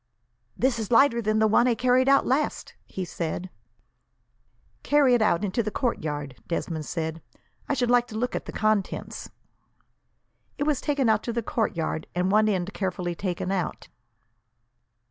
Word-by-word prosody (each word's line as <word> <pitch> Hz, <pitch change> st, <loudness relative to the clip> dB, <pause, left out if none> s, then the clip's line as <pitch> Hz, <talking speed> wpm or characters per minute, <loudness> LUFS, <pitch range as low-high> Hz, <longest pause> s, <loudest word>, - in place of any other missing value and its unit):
"This 255 Hz, -2 st, +1 dB
is 220 Hz, -, -4 dB
lighter 235 Hz, -1 st, +4 dB
than 215 Hz, 0 st, +1 dB
the 220 Hz, -, +4 dB
one 220 Hz, +3 st, +4 dB
I 240 Hz, -, +3 dB
carried 255 Hz, +3 st, +3 dB
out 275 Hz, -, +5 dB
last!" 285 Hz, +4 st, -1 dB
he 185 Hz, -, -5 dB
said. 175 Hz, +2 st, -4 dB, 1.3 s
"Carry 285 Hz, -3 st, +4 dB
it 240 Hz, -, +3 dB
out 210 Hz, -2 st, +2 dB
into 205 Hz, +4 st, 0 dB
the 215 Hz, -, -2 dB
courtyard," 150 Hz, -, -3 dB
Desmond 165 Hz, -2 st, -3 dB
said. 160 Hz, -1 st, -3 dB, 0.5 s
"I 285 Hz, -, +1 dB
should 245 Hz, -2 st, +1 dB
like 245 Hz, 0 st, +4 dB
to 220 Hz, -3 st, -7 dB
look 245 Hz, +3 st, -1 dB
at -, -, -4 dB
the -, -, -6 dB
contents." 215 Hz, -2 st, -1 dB, 1.3 s
It 290 Hz, -, -1 dB
was 295 Hz, -3 st, 0 dB
taken 285 Hz, -4 st, 0 dB
out 220 Hz, -1 st, +3 dB
to 235 Hz, -, -4 dB
the 235 Hz, 0 st, -2 dB
courtyard, 165 Hz, -9 st, -2 dB
and 180 Hz, +2 st, +1 dB
one 215 Hz, +1 st, +4 dB
end 190 Hz, 0 st, -1 dB
carefully 180 Hz, -2 st, -2 dB
taken 180 Hz, 0 st, -3 dB
out. 185 Hz, -3 st, -3 dB
215 Hz, 165 wpm, -26 LUFS, 180-245 Hz, 1.3 s, out